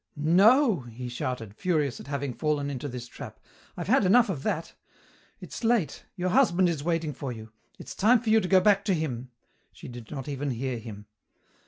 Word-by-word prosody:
"No!" 200 - +4
he 120 0 -8
shouted, 120 -3 -4
furious 150 -4 -1
at - - -11
having 140 -2 -3
fallen 145 0 -1
into 135 +1 -5
this 125 -2 -6
trap. - - -10 0.4
"I've 175 - -4
had 260 +3 +4
enough 220 +5 +5
of 160 -8 -3
that. 160 +3 -3 0.7
It's - - -9
late. 225 - 0
Your 185 -1 -1
husband 185 -7 +4
is 155 -4 -3
waiting 165 -2 -1
for 135 0 -5
you. 110 -2 -9 0.3
It's 135 - -9
time 230 - +4
for 220 -1 -1
you 220 - +6
to 185 - -2
go 190 0 +5
back 200 0 +4
to 195 -3 +2
him 130 -6 -4 0.2
" - - -42
She - - -11
did 120 -2 -10
not 135 -3 -6
even 145 0 -3
hear 125 0 -3
him. 105 -2 -10
150 Hz, 200 wpm, -27 LUFS, 125-190 Hz, 0.7 s, you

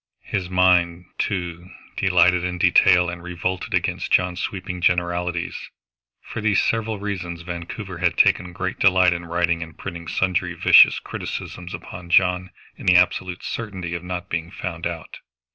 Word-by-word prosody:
His 95 -4 -3
mind, 90 -1 +3
too, 90 -2 -3 0.3
delighted 90 -1 +3
in 90 0 -2
detail 90 +1 +5
and 85 0 -5
revolted 90 +1 -3
against - - -2
John's 90 0 +2
sweeping 95 -2 -5
generalities. 85 -1 -1 0.5
For 110 - -6
these 105 -2 +2
several 115 -1 0
reasons 90 -4 -5
Vancouver 85 +2 -7
had 85 0 +1
taken 90 - +3
great 95 +1 -4
delight 90 -2 +5
in 85 0 -6
writing 85 0 0
and 80 -2 -8
printing 85 -1 -7
sundry 90 -1 -1
vicious - - +7
criticisms 90 0 -6
upon 90 -1 -10
John 90 +1 +3 0.3
in - - -10
the 90 - +6
absolute 90 0 +1
certainty 95 -6 -5
of 85 0 -4
not 90 0 -5
being 85 0 -3
found 85 -2 -4
out. 85 -2 -8
90 Hz, 150 wpm, -22 LUFS, 85-95 Hz, 0.5 s, vicious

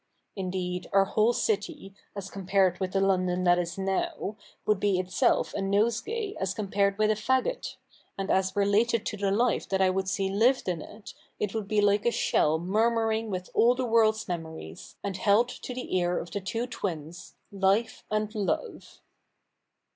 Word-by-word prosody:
Indeed, 180 -2 -3
our 195 0 +5
whole 215 +3 +2
city, 300 - -2 0.2
as 195 -1 -6
compared 190 -2 +1
with 190 -1 -3
the 195 - +2
London 185 -2 +1
that 175 0 +4
is 175 +2 -3
now, 200 - -2 0.3
would 210 -2 +2
be 200 -2 +2
itself 185 0 +1
a 200 - -2
nosegay 235 - 0
as 190 0 -2
compared 200 -1 0
with 215 0 +3
a - - +4
faggot; 260 - -1 0.4
and 195 0 -2
as 190 0 +1
related 210 +3 +2
to 210 - -3
the 200 0 0
life 230 +5 +1
that 190 - +1
I 190 -1 +4
would 190 0 -1
see 195 +1 0
lived 235 +6 +2
in 175 -3 -1
it, 210 +5 -11 0.3
it 210 -2 -2
would 220 -3 -3
be 210 0 +2
like 205 +1 +3
a - - +4
shell 155 -8 +2
murmuring 220 +4 +1
with 185 -2 -5
all 240 +2 +4
the 255 0 -1
world's 225 -1 +3
memories, 160 - -7
and 195 -2 -3
held 215 +5 +3
to 250 - -7
the 250 -5 -4
ear 175 -1 +1
of 170 - -5
the 200 - -3
two 225 +5 -2
twins. 175 -7 -6 0.2
Life 200 +3 +1
and 215 0 -1
Love.' 215 - -3
200 Hz, 175 wpm, -28 LUFS, 185-225 Hz, 0.4 s, our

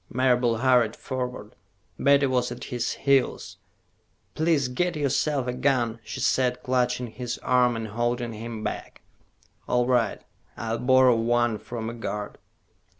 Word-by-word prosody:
Marable 125 -2 +2
hurried 120 -2 +3
forward. 125 -4 -5 0.5
Betty 140 0 +4
was 125 -2 0
at - - -7
his 120 -2 -2
heels. 140 -1 0 0.8
"Please 155 -4 +1
get 175 +7 -1
yourself 145 -1 0
a 125 - -2
gun," 125 -4 0
she 110 +1 -7
said, 125 -1 +1
clutching 125 -1 0
his 120 +1 -5
arm 125 -1 +3
and 110 -1 -4
holding 120 +1 -2
him 110 0 -6
back. - - -6 0.6
"All 125 0 +2
right. 120 -4 +1 0.4
I'll 115 0 -3
borrow 130 -1 +5
one 120 -1 +1
from 115 -2 -6
a 115 - -4
guard." 105 -3 -5
125 Hz, 140 wpm, -25 LUFS, 115-130 Hz, 0.8 s, borrow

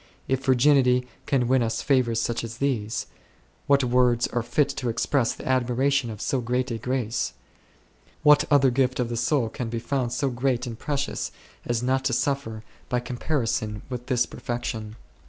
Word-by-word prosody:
If 130 0 0
virginity 130 -1 +4
then 125 - -21 0.2
can 130 -4 +2
win 130 0 +3
us 115 -1 -1
favours 125 -5 +2
such 120 0 -1
as 115 0 -6
these, 115 -6 -1 0.6
what 140 -1 +4
words 125 -1 +3
are 120 - -1
fit 125 +5 +1
to 135 -3 -3
express 120 +2 +1
the - - -9
admiration 130 +1 +1
of 110 -1 -7
so 135 -3 0
great 125 +2 -1
a 115 - -3
grace? 125 - -1 0.9
What 150 0 +7
other 140 -3 +5
gift 130 0 +1
of 120 -2 0
the 120 - -2
soul 120 +1 +1
can 115 +1 -5
be 115 - -3
found 120 +1 -1
so 130 +2 0
great 125 0 0
and 115 -2 -7
precious 145 -1 -2 0.4
as 120 0 0
not 130 +1 +1
to - - +1
suffer 135 -6 -1 0.3
by 125 - +1
comparison 120 -4 -2
with 125 0 -5
this 125 -2 +2
perfection 115 -3 -5
125 Hz, 175 wpm, -25 LUFS, 120-135 Hz, 0.9 s, What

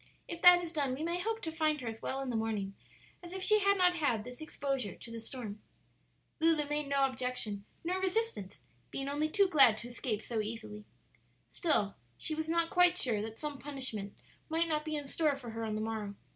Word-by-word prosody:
"If 340 0 -6
that 355 0 +9
is 335 -1 -6
done 280 -5 +1
we 295 - -5
may 340 +2 0
hope 450 +4 -2
to 320 - -2
find 310 -2 +1
her 245 - -5
as 225 0 -5
well 270 +1 -2
in 265 -2 -3
the - - -2
morning 215 -3 -1 0.5
as 350 0 -9
if 380 0 -4
she 425 +2 +6
had 400 0 +4
not 360 -1 +5
had 285 -10 +1
this 250 +4 -9
exposure 275 - -2
to 230 - -11
the 230 - -5
storm." 225 -3 -7 0.8
Lulu 320 -2 +3
made 295 0 -1
no 275 -1 +3
objection 250 -6 -2 0.2
nor 365 +3 -1
resistance, 380 - -1 0.3
being 275 0 -4
only 295 +2 0
too 400 +4 +4
glad 275 -10 +7
to 235 - -5
escape 235 -3 -3
so 225 -3 -1
easily. 215 -1 -6 0.7
Still 250 - +1 0.2
she 315 - -2
was 315 +1 -3
not 335 0 +1
quite 360 -2 +5
sure 230 - +1
that 220 +1 -5
some 295 -2 -4
punishment 255 -8 -4 0.3
might 325 +1 +2
not 305 -1 0
be 310 -1 -2
in 290 -1 -2
store 295 +1 +1
for 245 -4 -8
her 225 0 -4
on 215 -1 -2
the 215 - -2
morrow. 215 -2 -3
280 Hz, 215 wpm, -33 LUFS, 225-330 Hz, 0.8 s, that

